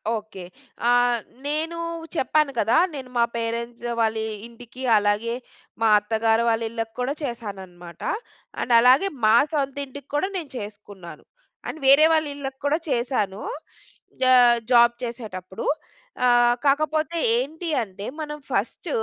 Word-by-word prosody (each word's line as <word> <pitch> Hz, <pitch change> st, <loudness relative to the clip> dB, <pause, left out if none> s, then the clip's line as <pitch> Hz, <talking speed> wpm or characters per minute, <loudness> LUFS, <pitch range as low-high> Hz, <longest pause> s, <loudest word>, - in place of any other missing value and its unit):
Okay, 210 Hz, -4 st, -7 dB, 0.5 s
ఆహ్, 245 Hz, -1 st, +3 dB, 0.3 s
నేను 315 Hz, +3 st, -2 dB, 0.4 s
చెప్పాను 305 Hz, 0 st, +2 dB
కదా. 220 Hz, +7 st, +3 dB, 0.2 s
నేను 260 Hz, -3 st, -7 dB
మా 235 Hz, -, +5 dB
పేరెంట్స్ 235 Hz, +1 st, -4 dB
వాళ్ళ 225 Hz, -1 st, +2 dB, 0.3 s
ఇంటికి, 235 Hz, +2 st, -13 dB, 0.2 s
అలాగే 210 Hz, +3 st, 0 dB, 0.5 s
మా 225 Hz, -, +4 dB
అత్తగారు 225 Hz, +2 st, +1 dB
వాళ్ళ 225 Hz, 0 st, +1 dB
ఇళ్ళకి 225 Hz, -1 st, -5 dB
కూడా 250 Hz, +3 st, 0 dB
చేసాననమాట. 190 Hz, -, -7 dB, 0.6 s
అండ్ 245 Hz, -, 0 dB
అలాగే 260 Hz, +11 st, +5 dB, 0.2 s
మా 215 Hz, +1 st, +6 dB, 0.2 s
సొంతింటికి 280 Hz, -1 st, -3 dB
కూడా 295 Hz, -, +1 dB
నేను 320 Hz, -5 st, -6 dB
చేసుకున్నాను. 205 Hz, -4 st, -9 dB, 0.4 s
అండ్ 315 Hz, -, -5 dB
వేరే 280 Hz, +3 st, +8 dB
వాళ్ళ 315 Hz, -1 st, +2 dB
ఇళ్ళకి 270 Hz, -1 st, -6 dB
కూడా 305 Hz, +3 st, +2 dB
చేసానూ. 235 Hz, -6 st, -1 dB, 0.8 s
జా 255 Hz, 0 st, +5 dB, 0.4 s
జాబ్ 235 Hz, 0 st, +6 dB
చేసేటప్పుడు. 210 Hz, -6 st, -6 dB, 0.6 s
ఆహ్, 240 Hz, -1 st, +5 dB
కాకపోతే 310 Hz, +3 st, +1 dB, 0.2 s
ఏంటి 320 Hz, +7 st, -3 dB
అంటే 200 Hz, -1 st, -9 dB, 0.2 s
మనం 300 Hz, 0 st, -5 dB
ఫస్ట్ -, -, -2 dB
240 Hz, 125 wpm, -24 LUFS, 220-280 Hz, 0.8 s, వేరే